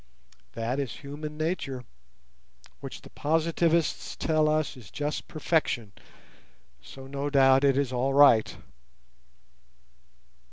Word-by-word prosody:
That 115 Hz, +4 st, -2 dB
is 135 Hz, -4 st, -2 dB
human 150 Hz, +1 st, -8 dB
nature, 155 Hz, -6 st, -3 dB, 1.0 s
which -, -, -9 dB
the -, -, -14 dB
Positivists 165 Hz, +1 st, 0 dB
tell 155 Hz, -1 st, +1 dB
us 155 Hz, -1 st, 0 dB
is 120 Hz, -8 st, -13 dB
just 145 Hz, -, -4 dB
perfection; 150 Hz, -9 st, -1 dB, 0.9 s
so 135 Hz, -1 st, -12 dB
no 140 Hz, +1 st, -4 dB
doubt 135 Hz, -1 st, +5 dB
it 135 Hz, -1 st, +3 dB
is 140 Hz, -2 st, 0 dB
all 130 Hz, +2 st, 0 dB
right. 140 Hz, -6 st, +5 dB
140 Hz, 110 wpm, -27 LUFS, 135-155 Hz, 1.0 s, doubt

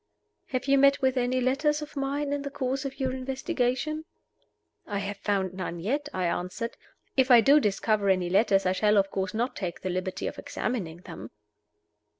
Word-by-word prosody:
"Have 255 Hz, -1 st, -2 dB
you 275 Hz, 0 st, +4 dB
met 275 Hz, 0 st, +5 dB
with 260 Hz, 0 st, +3 dB
any 250 Hz, 0 st, +1 dB
letters 295 Hz, +4 st, +1 dB
of 300 Hz, -, -11 dB
mine 280 Hz, +1 st, -1 dB
in 285 Hz, -, -1 dB
the 280 Hz, -, -4 dB
course 265 Hz, 0 st, -2 dB
of 275 Hz, +1 st, -6 dB
your 260 Hz, -1 st, 0 dB
investigations?" 265 Hz, +2 st, -1 dB, 0.8 s
"I 205 Hz, -, -2 dB
have 200 Hz, 0 st, -3 dB
found 195 Hz, -2 st, -1 dB
none 180 Hz, -2 st, -5 dB
yet," 280 Hz, -, -2 dB
I 185 Hz, -7 st, -1 dB
answered. 185 Hz, +7 st, -3 dB, 0.4 s
"If 260 Hz, -1 st, +3 dB
I 245 Hz, -2 st, +9 dB
do 280 Hz, +6 st, +6 dB
discover 210 Hz, -2 st, +1 dB
any 185 Hz, -2 st, +2 dB
letters, 195 Hz, +1 st, +3 dB
I 185 Hz, -, +3 dB
shall, 210 Hz, +3 st, +3 dB
of 195 Hz, 0 st, +2 dB
course, 190 Hz, +1 st, -2 dB
not 240 Hz, +4 st, -1 dB
take 175 Hz, -3 st, -4 dB
the 185 Hz, -, -2 dB
liberty 185 Hz, +1 st, -3 dB
of -, -, -4 dB
examining 175 Hz, -9 st, -4 dB
them." -, -, -9 dB
245 Hz, 185 wpm, -27 LUFS, 195-275 Hz, 0.8 s, I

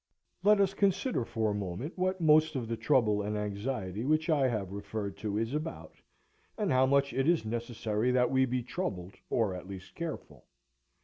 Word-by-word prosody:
Let 210 Hz, 0 st, +5 dB
us 195 Hz, -1 st, +3 dB
consider 200 Hz, -, +1 dB
for 110 Hz, -1 st, -1 dB
a -, -, -1 dB
moment 100 Hz, -, -4 dB
what 185 Hz, 0 st, 0 dB
most 155 Hz, -1 st, +4 dB
of 120 Hz, -4 st, -2 dB
the 115 Hz, -, -2 dB
trouble 110 Hz, -3 st, +2 dB
and 105 Hz, +1 st, -2 dB
anxiety 105 Hz, 0 st, -3 dB
which 155 Hz, +4 st, +1 dB
I 140 Hz, -4 st, +3 dB
have 105 Hz, -6 st, -2 dB
referred 100 Hz, 0 st, -4 dB
to 105 Hz, -1 st, -3 dB
is 115 Hz, +3 st, -1 dB
about, 155 Hz, +2 st, -4 dB, 0.6 s
and 210 Hz, -6 st, 0 dB
how 130 Hz, +1 st, +4 dB
much 140 Hz, 0 st, +2 dB
it 135 Hz, +4 st, +2 dB
is 170 Hz, -9 st, +2 dB
necessary 115 Hz, 0 st, -1 dB
that 125 Hz, 0 st, +3 dB
we 130 Hz, 0 st, +4 dB
be 125 Hz, -1 st, -2 dB
troubled, 100 Hz, -, -4 dB, 0.2 s
or, 110 Hz, -5 st, +1 dB
at 90 Hz, 0 st, -8 dB
least, 95 Hz, -1 st, -9 dB
careful. 170 Hz, -1 st, -7 dB
125 Hz, 185 wpm, -31 LUFS, 105-155 Hz, 0.6 s, Let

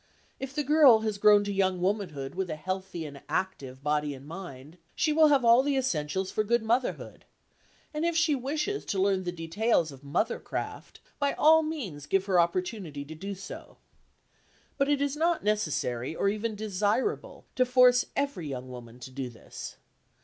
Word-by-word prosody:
If 270 Hz, 0 st, -6 dB
the 295 Hz, -, 0 dB
girl 285 Hz, -6 st, +6 dB
has 215 Hz, -2 st, -2 dB
grown 205 Hz, 0 st, +6 dB
to 205 Hz, 0 st, -3 dB
young 190 Hz, -2 st, +1 dB
womanhood 180 Hz, -8 st, -2 dB
with 190 Hz, -1 st, -3 dB
a 155 Hz, -, -2 dB
healthy 185 Hz, 0 st, -4 dB
and 140 Hz, -2 st, -9 dB
active 135 Hz, -8 st, -3 dB
body 150 Hz, -1 st, 0 dB
and 135 Hz, +1 st, -13 dB
mind, 160 Hz, -2 st, -9 dB, 0.2 s
she 310 Hz, -, +1 dB
will 310 Hz, 0 st, +6 dB
have 280 Hz, -4 st, +3 dB
all 235 Hz, +2 st, +7 dB
the 280 Hz, 0 st, 0 dB
essentials 190 Hz, -, -1 dB
for 215 Hz, -, 0 dB
good 235 Hz, +2 st, +1 dB
motherhood, 240 Hz, +3 st, -1 dB, 0.7 s
and 305 Hz, +1 st, -2 dB
if 340 Hz, -1 st, +1 dB
she 325 Hz, -2 st, +3 dB
wishes 300 Hz, +10 st, -2 dB
to 195 Hz, -, -2 dB
learn 190 Hz, -1 st, +1 dB
the 175 Hz, -, -1 dB
details 170 Hz, +1 st, 0 dB
of 135 Hz, -1 st, -13 dB
mothercraft, 180 Hz, +12 st, -3 dB, 0.2 s
by 285 Hz, -1 st, +1 dB
all 320 Hz, +1 st, +6 dB
means 225 Hz, -, -5 dB
give 195 Hz, 0 st, +1 dB
her 190 Hz, -3 st, +3 dB
opportunity 170 Hz, -3 st, -1 dB
to 155 Hz, -, -9 dB
do 195 Hz, +5 st, -6 dB
so. 195 Hz, -, -10 dB, 1.0 s
But 275 Hz, 0 st, +1 dB
it 285 Hz, -1 st, +2 dB
is 285 Hz, 0 st, -1 dB
not 335 Hz, +2 st, +1 dB
necessary, 155 Hz, -, -1 dB
or 200 Hz, -, +1 dB
even 215 Hz, +2 st, -2 dB
desirable, 210 Hz, -, -1 dB
to 255 Hz, -, +4 dB
force 250 Hz, 0 st, +5 dB
every 275 Hz, -, -2 dB
young 130 Hz, -2 st, -6 dB
woman 120 Hz, -1 st, -10 dB
to 130 Hz, -, -9 dB
do 130 Hz, -1 st, -5 dB
this. 120 Hz, -, -9 dB
200 Hz, 180 wpm, -28 LUFS, 155-260 Hz, 1.0 s, all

